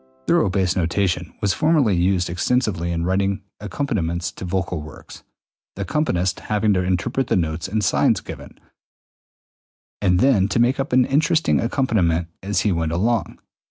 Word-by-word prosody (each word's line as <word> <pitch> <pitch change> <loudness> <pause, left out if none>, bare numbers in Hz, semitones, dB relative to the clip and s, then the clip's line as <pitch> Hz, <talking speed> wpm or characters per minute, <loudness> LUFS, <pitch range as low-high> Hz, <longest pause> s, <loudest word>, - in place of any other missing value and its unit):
] 65 0 -36
Thorough - - +3
bass 90 -1 0
notation 90 +1 -1
was 100 -2 +1
formerly 150 - +2
used 90 0 +1
extensively 90 -1 -1
in 85 0 -2
writing 95 +1 0 0.2
accompaniments 95 - -2
to - - -10
vocal 90 -2 -2
works, 75 -2 -12 0.5
the 100 - -3
accompanist 95 - -1
having 105 0 0
to 90 - +1
interpret 95 +8 -1
the - - +1
notes 80 -2 -1
and 105 +2 -1
signs - - +2
given, - - -10 1.4
and 90 -3 +3
then 115 -7 +3
to 100 +3 -1
make 125 +4 +2
up 135 - -2
an 125 0 +4
interesting 160 +3 +2
accompaniment 95 - 0
as 95 -1 -1
he 105 - +1
went 80 -2 -1
along. 110 +6 0
95 Hz, 160 wpm, -21 LUFS, 85-115 Hz, 1.4 s, an